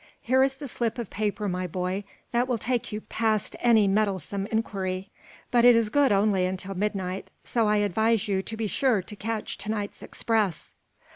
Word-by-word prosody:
Here 260 +2 +2
is 270 0 +3
the 285 +1 -7
slip 235 -2 -2
of 235 -4 -5
paper, 210 0 -1
my 180 -1 -2
boy, 185 +3 -3 0.3
that 245 +1 +2
will 245 -2 0
take 240 +1 -2
you 210 0 -4
past 220 -2 -1
any 225 -4 +5
meddlesome 200 -1 0
inquiry. 195 -3 -2 0.4
But 240 -1 +4
it 245 -1 +8
is 230 -2 +2
good 280 +2 +3
only 200 -1 +3
until 190 +1 -4
midnight, 195 -1 -2
so 230 -3 +1
I 210 0 +3
advise 220 +2 +1
you 195 -2 +1
to 220 +3 -7
be 225 - -1
sure 220 -2 +1
to 210 - -9
catch 220 +1 -4
to 210 - -5
night's 205 -2 -3
express." 215 -7 -1
210 Hz, 190 wpm, -27 LUFS, 195-230 Hz, 0.4 s, it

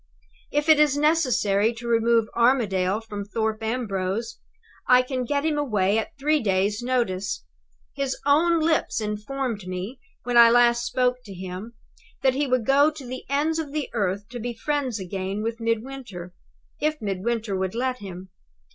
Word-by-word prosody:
If 295 +1 0
it 315 -1 +6
is 295 -2 +4
necessary 250 -9 +2
to 235 +1 -7
remove 230 -1 +3
Armadale 215 -5 +2
from 210 -2 -6
Thorpe 220 +1 -2
Ambrose, 225 -1 -2 0.5
I 250 0 +6
can 255 -1 -3
get 285 +4 -1
him 305 -2 +1
away 210 -6 +1
at 220 - -6
three 300 +2 +2
days' 200 +1 +1
notice. 200 - -1 0.5
His 275 -2 -2
own 330 +4 +4
lips 315 -5 +1
informed 215 0 -3
me, 185 +8 -5 0.2
when 245 -1 0
I 235 0 +9
last 240 0 +4
spoke 250 0 +1
to 200 -3 -9
him, 185 +5 -7 0.5
that 265 -1 +4
he 285 +2 0
would 255 -3 +1
go 285 +4 +5
to 300 -3 -10
the 255 +1 -7
ends 305 +3 +1
of 295 -3 -5
the 300 -2 -2
earth 200 -2 -1
to 245 0 -7
be 240 +1 -4
friends 270 -4 -2
again 190 +2 -4
with 230 +1 -3
Midwinter, 230 -6 -4 0.5
if 305 0 0
Midwinter 210 +1 -2
would 190 +2 -2
let 255 +1 -1
him. 185 -2 -9
235 Hz, 165 wpm, -24 LUFS, 205-270 Hz, 0.5 s, I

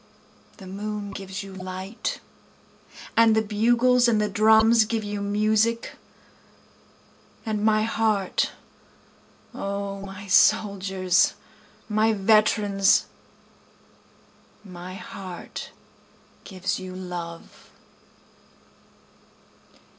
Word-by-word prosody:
The 195 - -12
moon 205 +1 -5
gives 195 0 -6
you 195 -1 -10
light, 185 +3 -5 0.9
And 225 -1 +5
the 220 - +3
bugles 240 +4 +3
and 225 -3 +2
the 210 0 0
drums 220 +2 +5
give 225 0 -2
you 205 0 -4
music, 215 +3 +1 1.5
And 215 -2 -2
my 215 0 +3
heart, 220 -4 0 1.0
O 200 0 -4
my 195 0 -9
soldiers, 190 -2 +3 0.5
my 220 +1 +2
veterans, 205 -1 +3 1.6
My 180 -1 -9
heart 185 -2 -8 0.8
gives 185 -2 -3
you 185 -1 -8
love. 175 -2 -8
205 Hz, 80 wpm, -24 LUFS, 190-220 Hz, 1.6 s, And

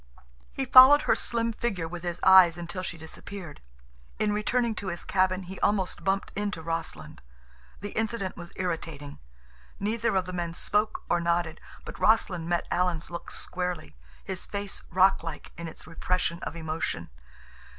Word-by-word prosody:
He 270 - -2
followed 260 +3 +9
her - - +4
slim 230 -1 -1
figure 195 -8 -2
with 175 +1 -7
his 175 -1 -4
eyes 185 -3 +8
until 175 +2 -5
she 180 -2 -5
disappeared. 165 +1 -9 0.6
In 210 - +1
returning 230 +3 +1
to 200 - -6
his 175 -2 -3
cabin 185 0 +1
he 185 +1 -8
almost 190 -4 0
bumped 195 +2 0
into 205 -4 -3
Rossland. 165 0 -5 0.6
The 205 0 -5
incident 220 -3 -2
was 175 0 -9
irritating. 165 - -4 0.6
Neither 220 +1 0
of 185 -1 +2
the 185 - -6
men 170 -1 -3
spoke 210 +4 0
or 175 - +1
nodded, 170 -1 0 0.2
but - - -8
Rossland 180 -6 +2
met 175 -1 +1
Alan's 175 -2 0
look 170 - -6
squarely, 180 - -3 0.3
his 190 -2 -5
face 200 -1 -5
rock 190 +2 +4
like 165 -2 -7
in 170 0 -6
its 160 - -11
repression 170 +1 -1
of - - -5
emotion. 160 - -3
180 Hz, 160 wpm, -28 LUFS, 170-205 Hz, 0.6 s, followed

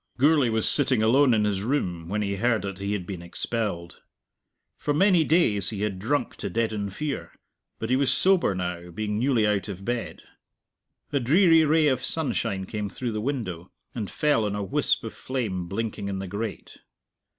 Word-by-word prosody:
Gourlay 145 -1 +4
was 110 -1 0
sitting 130 -6 +3
alone 130 +4 +5
in 110 -2 +3
his 100 -2 0
room 90 - -2
when 105 +2 -1
he 100 -1 -2
heard 120 +2 +1
that 100 -1 -5
he 100 +1 -2
had 95 -4 -3
been 90 -2 -6
expelled. 85 -1 -4 0.8
For 145 - -1
many 185 0 +4
days 145 - +3
he 105 -2 -4
had 100 -3 -2
drunk 140 +9 -1
to - - -4
deaden 110 -3 -1
fear, 145 +8 -4 0.5
but 110 +2 -4
he - - +5
was 135 0 +3
sober 185 - +3
now, 90 -1 -4
being 105 +4 -3
newly 125 -3 +2
out 105 -1 0
of 95 -1 -7
bed. 120 -1 -3 0.9
A 140 - +3
dreary 165 +5 +5
ray 155 0 +4
of 130 -2 +1
sunshine 100 -11 -1
came 105 +1 -4
through 120 +3 -4
the 105 -1 -3
window, 105 -10 -4 0.2
and 110 -5 -4
fell 150 -7 +1
on 105 -1 -2
a 105 - -2
wisp 95 - 0
of - - -6
flame 105 -9 -3
blinking 100 +1 -3
in 100 -1 -3
the 95 - -4
grate. 105 +3 -6
110 Hz, 185 wpm, -26 LUFS, 100-135 Hz, 0.9 s, alone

